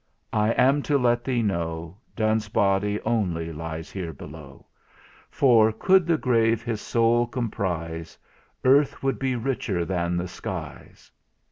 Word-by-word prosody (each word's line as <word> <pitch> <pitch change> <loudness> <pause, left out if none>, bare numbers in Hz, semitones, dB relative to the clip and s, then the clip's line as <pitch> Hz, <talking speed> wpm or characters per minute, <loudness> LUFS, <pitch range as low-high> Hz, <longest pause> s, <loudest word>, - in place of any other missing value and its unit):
I 105 0 +2
am 135 +4 +3
to 145 - +4
let 120 -2 +2
thee 125 -3 0
know, 85 -4 -3 0.2
Donne's 110 -1 0
body 100 0 +1
only 85 -8 -1
lies 80 +1 -6
below; 85 -7 -8 0.6
For, 115 -5 +4
could 185 - +3
the 165 -2 +3
grave 115 -4 +2
his 110 -3 -3
soul 120 +1 +2
comprise, 85 -9 -4 0.5
Earth 140 +2 +3
would 135 0 0
be 130 -1 0
richer 115 -8 -2
than 85 0 -1
the 90 +1 -2
skies!" 90 - -8
110 Hz, 130 wpm, -25 LUFS, 85-120 Hz, 0.6 s, to